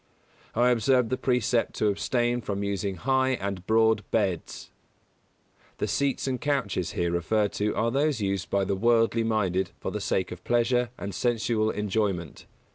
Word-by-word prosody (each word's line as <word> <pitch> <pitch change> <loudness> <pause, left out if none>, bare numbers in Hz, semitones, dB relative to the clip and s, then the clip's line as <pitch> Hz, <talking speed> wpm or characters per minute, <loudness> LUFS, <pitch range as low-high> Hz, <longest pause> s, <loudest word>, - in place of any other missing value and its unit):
I 120 +2 +4
observe 125 0 +2
the 130 - +1
precept 125 -2 0
to 105 - +2
abstain 120 +4 0
from 100 -2 -3
using 100 -1 -2
high 130 +3 +1
and 100 -5 -4
broad 110 -1 +3
beds. 95 -6 -2 1.1
The - - -1
seats 140 -2 0
and 130 -2 -2
couches 135 - -1
here 85 -1 0
referred 100 +5 +1
to 105 0 +1
are 115 +1 +1
those 140 0 +1
used 100 -3 -2
by 100 -1 +1
the 100 - 0
worldly 115 +2 +3
minded 95 -5 0
for - - -4
the - - -4
sake 95 - -1
of 90 0 -8
pleasure 120 0 +2
and 100 0 -5
sensual 115 -2 0
enjoyment. 100 -6 -2
110 Hz, 160 wpm, -27 LUFS, 100-120 Hz, 1.1 s, I